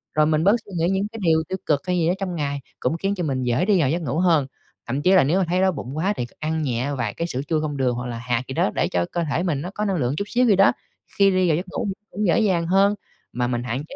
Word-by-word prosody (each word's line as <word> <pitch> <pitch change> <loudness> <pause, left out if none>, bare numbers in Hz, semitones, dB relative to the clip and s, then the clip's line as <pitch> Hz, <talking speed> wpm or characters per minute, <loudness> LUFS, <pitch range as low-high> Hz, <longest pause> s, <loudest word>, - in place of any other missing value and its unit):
rồi 155 0 +4
mình 155 0 +1
bớt 200 +5 +5
suy 205 - -14
nghĩ 165 +1 +1
những 195 +2 0
cái 225 - -8
điều 160 -2 +3
tiêu 190 - -2
cực 145 -2 +1
hay 180 0 +1
gì 165 - +2
đó 175 - +3
trong 185 -3 -3
ngày, 145 -3 -2 0.2
cũng 130 +7 -1
khiến 195 +3 -1
cho 180 - -3
mình 130 -4 -1
dễ 125 +8 +1
đi 205 -2 +3
vào 140 -6 +2
giấc 170 +5 -1
ngủ 145 -2 -2
hơn, 165 -7 +3 0.4
thậm 130 +4 -2
chí 180 +5 +3
là 185 - +6
nếu 165 +8 +2
mà 190 - +2
thấy 180 +1 +1
đói 190 - +4
bụng 140 -3 -6
quá 190 +6 +1
thì 120 - -1
c - - -15
ăn 160 +1 -1
nhẹ 130 +1 -1
vài 115 -6 -2
cái 170 - -3
sữa 130 -5 -3
chua 155 -2 +1
không 145 -2 -3
đường 125 -2 +1
hoặc 125 +1 -4
là 120 -1 -5
hạt 120 +1 -1
gì 130 - -5
đó 105 - +1
để - - +1
cho 90 -1 0
cơ 170 - -1
thể 160 +6 0
mình 155 -6 -1
nó 180 - -5
có 210 - -1
năng 195 - 0
lượng 130 -4 0
chút 200 - -1
xíu 250 +3 +2
gì 215 -4 +5
đó, 195 +1 +6 0.5
khi 200 0 +6
đi 185 -1 +2
vào 155 - +3
giấc 180 - -4
ngủ - - -3
mình 195 - -2 0.2
cũng 210 0 -1
dễ 170 - +3
dàng 185 -6 +1
hơn. 195 +3 +4 0.4
Mà 120 0 0
mình 120 -1 -2
hạn 125 +3 -3
chế - - -9
160 Hz, 325 wpm, -23 LUFS, 135-185 Hz, 0.5 s, là